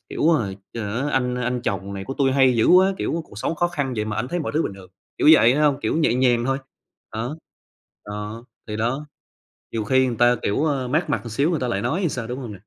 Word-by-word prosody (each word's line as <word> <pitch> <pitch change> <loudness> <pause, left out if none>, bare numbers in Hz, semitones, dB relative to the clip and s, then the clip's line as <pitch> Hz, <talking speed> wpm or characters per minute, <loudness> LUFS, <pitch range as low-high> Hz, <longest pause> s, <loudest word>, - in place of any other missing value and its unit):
Hiểu - - -3
rồi. 100 -9 -1 0.2
Chờ 110 0 -3
á 145 - -1
anh 125 -1 +1
anh 125 0 -2
chồng 100 -2 -3
này 95 0 -5
của 135 - -5
tui 135 -2 +2
hay 130 -2 +4
dữ 110 - +3
quá!", 185 +2 +6
kiểu 165 - -2
"Cuộc 100 - -11
sống 160 - -1
khó 175 +2 +1
khăn 145 -6 -2
vậy 105 - -1
mà 105 -1 -4
ảnh 120 +4 -2
thấy 175 - -2
mọi 155 - -3
thứ 160 - +2
bình 100 - -4
thường." 95 -2 -14 0.3
Kiểu - - +4
vậy 125 -5 +6
h - - 0
hông, 145 -2 +2
kiểu - - -1
nhẹ 155 -7 +2
nhàng 120 -2 +2
thôi. 135 +1 0 0.6
Đó. 120 +7 -3 0.7
Đó, 105 +3 -6 0.2
thì 105 - -3
đó. 120 +7 -2 0.7
Nhiều 110 -2 -2
khi 130 +4 +3
người 120 -2 -2
ta 120 +1 +4
kiểu, 105 +9 0
ờ, 140 -5 -1
mát 155 +4 0
mặt - - 0
một 115 - -7
xíu 140 +9 +1
người 165 - -1
ta 125 - -1
lại 100 -4 -1
nói 170 - -1
thì 175 - +2
sao, 125 -5 -4
đúng 125 +2 -5
không 120 -5 -6
nè? 100 - -10
125 Hz, 270 wpm, -23 LUFS, 110-145 Hz, 0.7 s, quá